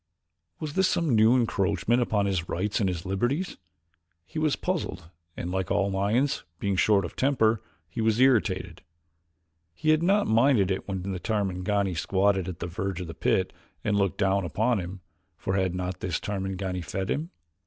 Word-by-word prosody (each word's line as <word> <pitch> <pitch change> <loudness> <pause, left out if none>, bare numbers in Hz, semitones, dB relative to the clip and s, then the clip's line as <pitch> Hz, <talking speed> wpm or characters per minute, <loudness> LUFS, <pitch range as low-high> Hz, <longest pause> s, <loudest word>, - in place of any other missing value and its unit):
Was 150 -2 -4
this 190 +2 +3
some 165 -8 +1
new 110 +3 +6
encroachment 120 0 +1
upon 105 -4 +1
his 95 -3 -1
rights 100 +4 -1
and 100 -3 +2
his 85 -1 -4
liberties? 120 - -1 0.7
He 155 - -5
was 155 -2 +2
puzzled 155 - -3 0.3
and, 90 - -4
like 95 -2 -1
all 100 -1 +1
lions, 110 +9 +1
being 100 +1 -1
short 100 0 +3
of - - -8
temper, 115 -6 +2 0.3
he 85 +7 -4
was 110 0 +2
irritated. 95 -10 +2 0.9
He 155 - +2
had 155 0 +3
not 200 +4 +3
minded 115 -4 +4
it 95 - -2
when 95 -2 -3
the 95 -1 -3
Tarmangani 100 -2 0
squatted 95 +2 +1
upon 90 -2 -5
the - - -4
verge 95 -1 -2
of - - -4
the 80 - -7
pit - - 0 0.3
and 105 - +1
looked 100 -1 +1
down 100 0 +2
upon 110 - +1
him, 90 +1 -6 0.4
for 95 - -2
had 95 -2 +1
not 90 0 -3
this 90 -3 -2
Tarmangani 95 -2 -3
fed 95 +3 -3
him? 155 +4 -2
100 Hz, 175 wpm, -27 LUFS, 95-115 Hz, 0.9 s, new